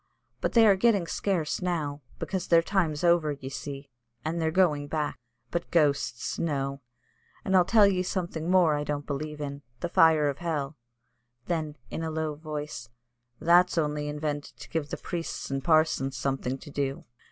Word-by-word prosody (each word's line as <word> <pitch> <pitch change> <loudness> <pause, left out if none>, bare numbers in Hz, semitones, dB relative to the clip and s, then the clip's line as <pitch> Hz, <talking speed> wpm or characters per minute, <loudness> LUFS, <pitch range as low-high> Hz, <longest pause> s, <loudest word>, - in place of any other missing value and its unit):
But 175 - -1
they 230 -1 +7
are 200 -2 +6
getting 200 -2 +3
scarce 170 -3 -1
now, 155 -5 -2 0.2
because 190 -2 -3
their 165 -1 +5
time's 170 -6 0
over, 170 -3 +3
ye 135 -2 -7
see, 140 0 -7 0.3
and 165 +2 -1
they're 160 - +2
going 155 -4 +2
back. 150 -1 -2 0.3
But 170 - -2
ghosts, 145 -7 +1
no! 140 -3 -1 0.6
And 190 - +2
I'll 180 -1 +6
tell 210 +2 +6
ye 190 -2 +2
something 175 -3 -3
more 180 -4 +5
I 145 0 -1
don't 145 -1 -3
believe 150 +1 -4
in 140 -1 -5 0.2
the 175 - -3
fire 160 -3 +5
of 140 -1 -2
hell;" 155 -4 -2 0.7
then, 155 -3 -2
in - - -3
a 160 - -2
low 160 -1 -2
voice, 150 -5 -6 0.5
"that's 175 +1 +4
only 150 -2 0
invented 150 -1 -4
to - - -11
give 155 -3 -2
the - - -4
priests 170 -5 -5
and 135 0 -1
the - - -20
parsons 155 -5 +2
something 135 0 -1
to 145 - -12
do." 140 -1 -2
155 Hz, 175 wpm, -28 LUFS, 145-175 Hz, 0.7 s, they